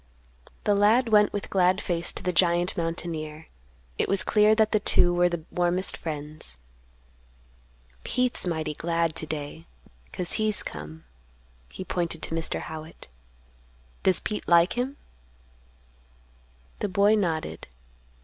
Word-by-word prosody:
The 205 Hz, -, +2 dB
lad 220 Hz, +5 st, +3 dB
went 210 Hz, -1 st, +5 dB
with 205 Hz, -, -5 dB
glad 185 Hz, 0 st, +3 dB
face 170 Hz, -3 st, 0 dB
to -, -, -8 dB
the 180 Hz, -, -1 dB
giant 175 Hz, +1 st, +2 dB
mountaineer. 165 Hz, -2 st, -5 dB, 0.5 s
It -, -, 0 dB
was 195 Hz, -1 st, +2 dB
clear 215 Hz, 0 st, +4 dB
that 220 Hz, -1 st, +2 dB
the 215 Hz, -, +3 dB
two 175 Hz, -3 st, +3 dB
were 175 Hz, 0 st, +3 dB
the 170 Hz, -2 st, -4 dB
warmest 180 Hz, +1 st, 0 dB
friends. 150 Hz, -, -6 dB, 1.5 s
"Pete's 250 Hz, -6 st, 0 dB
mighty 160 Hz, -3 st, -2 dB
glad 165 Hz, +1 st, -1 dB
to 155 Hz, -, -1 dB
day, 145 Hz, -, -6 dB, 0.4 s
'cause 180 Hz, -, -4 dB
he's 215 Hz, -1 st, +1 dB
come." 80 Hz, +1 st, -8 dB, 0.7 s
He 185 Hz, -, -7 dB
pointed 170 Hz, -3 st, -2 dB
to -, -, -1 dB
Mr. 165 Hz, 0 st, -2 dB
Howitt. 160 Hz, -, -9 dB, 0.9 s
"Does 185 Hz, -, +7 dB
Pete 210 Hz, -, -5 dB
like 170 Hz, +1 st, +5 dB
him?" 260 Hz, +4 st, -3 dB, 1.8 s
The -, -, -2 dB
boy 200 Hz, +3 st, +3 dB
nodded. 170 Hz, -7 st, -2 dB
175 Hz, 130 wpm, -26 LUFS, 160-205 Hz, 1.8 s, Does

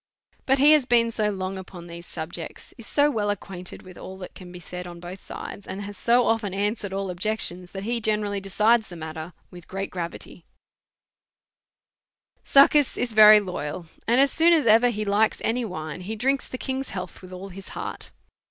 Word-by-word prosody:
But 270 Hz, +1 st, +4 dB
he 285 Hz, +3 st, +6 dB
has 300 Hz, -5 st, +5 dB
been 235 Hz, -1 st, +4 dB
so 215 Hz, -2 st, 0 dB
long 190 Hz, -1 st, -4 dB
upon 180 Hz, -2 st, -10 dB
these 170 Hz, 0 st, -10 dB
subjects, 165 Hz, 0 st, -8 dB
is 230 Hz, -, -12 dB
so 290 Hz, 0 st, +3 dB
well 210 Hz, -5 st, -1 dB
acquainted 185 Hz, -3 st, -6 dB
with 185 Hz, -1 st, -13 dB
all 190 Hz, -, -8 dB
that 185 Hz, -1 st, -9 dB
can 180 Hz, -2 st, -11 dB
be 180 Hz, -, -9 dB
said 180 Hz, +1 st, -7 dB
on 175 Hz, -1 st, -9 dB
both 175 Hz, +2 st, -8 dB
sides, 200 Hz, -, -8 dB
and 200 Hz, +1 st, -5 dB
has 205 Hz, 0 st, -7 dB
so 240 Hz, +3 st, +3 dB
often 220 Hz, -4 st, 0 dB
answered 205 Hz, 0 st, -1 dB
all 195 Hz, -1 st, -3 dB
objections, 180 Hz, -1 st, -3 dB
that 195 Hz, 0 st, -5 dB
he 235 Hz, +2 st, -1 dB
generally 210 Hz, -2 st, 0 dB
decides 215 Hz, +4 st, +2 dB
the 175 Hz, -, -10 dB
matter 160 Hz, +1 st, -7 dB, 0.2 s
with 175 Hz, -2 st, -12 dB
great 195 Hz, +1 st, -4 dB
giavity, 175 Hz, 0 st, -6 dB, 2.0 s
Succus 280 Hz, 0 st, +5 dB
is 240 Hz, -2 st, -2 dB
very 215 Hz, 0 st, +9 dB
loyal, 180 Hz, -3 st, -5 dB, 0.2 s
and 240 Hz, +3 st, +4 dB
as 275 Hz, 0 st, +5 dB
soon 335 Hz, +1 st, +5 dB
as 310 Hz, -6 st, +3 dB
ever 230 Hz, +2 st, +6 dB
he 215 Hz, -2 st, -3 dB
likes 210 Hz, +2 st, +2 dB
any 240 Hz, +2 st, 0 dB
wine 155 Hz, -5 st, -6 dB
he 210 Hz, +5 st, -5 dB
drinks 270 Hz, +5 st, 0 dB
the 255 Hz, -, -6 dB
king's 265 Hz, +1 st, -3 dB
health 180 Hz, -2 st, -7 dB
with 185 Hz, -1 st, -12 dB
all 185 Hz, +2 st, -8 dB
his 195 Hz, +1 st, -10 dB
heart. -, -, -5 dB
200 Hz, 195 wpm, -25 LUFS, 180-230 Hz, 2.0 s, very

